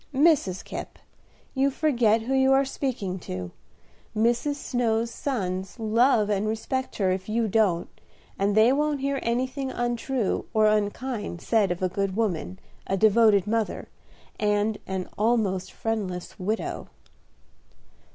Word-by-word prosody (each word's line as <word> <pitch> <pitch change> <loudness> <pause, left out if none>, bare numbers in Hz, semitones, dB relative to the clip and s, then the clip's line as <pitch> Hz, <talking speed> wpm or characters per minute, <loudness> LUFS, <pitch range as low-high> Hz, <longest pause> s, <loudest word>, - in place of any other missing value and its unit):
"Mrs. 280 - +3
Kipp, - - -7 0.6
you 270 +1 +2
forget 240 -7 +2
who 260 +4 -2
you 265 0 +4
are 270 +1 +4
speaking 235 -9 -3
to. 90 - -6 0.7
Mrs. 240 +6 +2
Snow's 235 -4 -1
sons 190 -9 -3
love 225 0 +3
and 205 0 0
respect 255 +4 -2
her 190 -3 +1
if 185 +2 -3
you 225 +1 +1
don't, 195 -5 +2 0.5
and 200 +1 +1
they 225 +4 +6
won't 295 0 0
hear 275 0 0
anything 255 +3 -1
untrue 240 -1 -1
or 215 0 +5
unkind 210 -1 -1
said 215 +1 +2
of 175 +1 -3
a - - +3
good 195 +1 -2
woman, 190 -4 -1 0.3
a 195 - 0
devoted 215 -1 +5
mother, 220 0 -2 0.5
and 210 0 +1
an 190 -1 -3
almost 210 -5 +1
friendless 205 -4 -4
widow." 210 +4 -3
220 Hz, 130 wpm, -26 LUFS, 195-250 Hz, 0.7 s, they